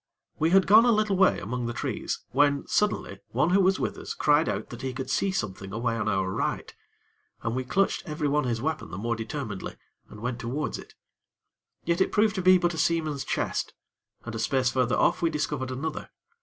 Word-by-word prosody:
We 160 - +3
had 190 +1 +5
gone 215 +3 +7
a 240 - +5
little 215 -2 +2
way 190 0 +4
among 120 +5 -3
the 120 - -3
trees, - - -3
when, 140 +1 +2
suddenly, 205 - 0
one 135 +8 +1
who 195 +2 +5
was 190 0 +3
with - - -2
us - - -6
cried 150 +2 +3
out - - -4
that 120 - -8
he 130 -1 -3
could 130 0 -5
see 195 - +1
something 100 - -4
away 115 +2 -1
on 110 -2 -2
our 95 -2 0
right, 95 - -2 0.7
and 115 +1 -1
we 130 - -1
clutched 190 +10 +1
everyone 150 -2 0
his 115 -1 -2
weapon 160 +1 -2
the - - -7
more 115 +3 -1
determinedly, 110 -2 -5 0.3
and 105 - -11
went 120 0 -3
towards 130 +6 -3
it. - - -13 0.9
Yet 170 +2 +1
it - - +2
proved 210 0 +3
to 190 - -2
be 185 +1 +6
but 175 -1 0
a 160 - -4
seaman's 155 -5 0
chest, - - -2 0.5
and 120 - -6
a 115 - -4
space 125 +2 +1
further 125 -2 +1
off, - - +2
we 165 - +3
discovered 145 -4 -2
another. 150 +5 -4
140 Hz, 210 wpm, -27 LUFS, 115-170 Hz, 0.9 s, gone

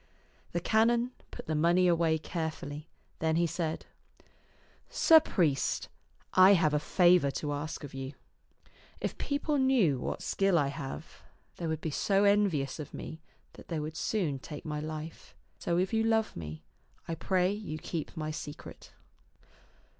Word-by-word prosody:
The 175 - -1
canon 235 +6 +2 0.2
put - - -9
the 160 - -2
money 170 +4 +4
away 165 -2 +3
carefully; 155 -2 -5 0.3
then 160 0 +1
he 170 +1 +3
said, 165 -1 -3 0.6
" - - -33 0.2
Sir 330 -10 +7
priest, 160 - 0 0.4
I 185 +2 +8
have 165 -5 +3
a 150 - +3
favor 175 -2 +4
to 145 +2 -3
ask 150 +2 -5
of 145 - -8
you. 135 +1 -5 0.9
If - - -4
people 285 +1 0
knew 240 - +3
what - - -4
skill 195 -3 +2
I 145 -3 +2
have, 140 -1 -7 0.4
they 170 - -3
would 160 -1 -2
be 160 - -3
so 195 +6 +2
envious 200 -10 +2
of 150 - -7
me 160 - -7 0.3
that - - -14
they 165 -3 -2
would 155 +1 -5
soon 165 -6 -1
take 150 +2 -9
my 150 -1 -3
life. 155 +1 -7 0.2
So 170 - 0
if 185 +4 0
you 225 - +3
love 225 -1 +1
me, 80 -1 -7 0.4
I 165 - -2
pray 180 +3 +1
you 205 -7 -5
keep 165 +1 -5
my 155 -1 -2
secret." 150 -2 -9
165 Hz, 160 wpm, -30 LUFS, 150-195 Hz, 0.9 s, I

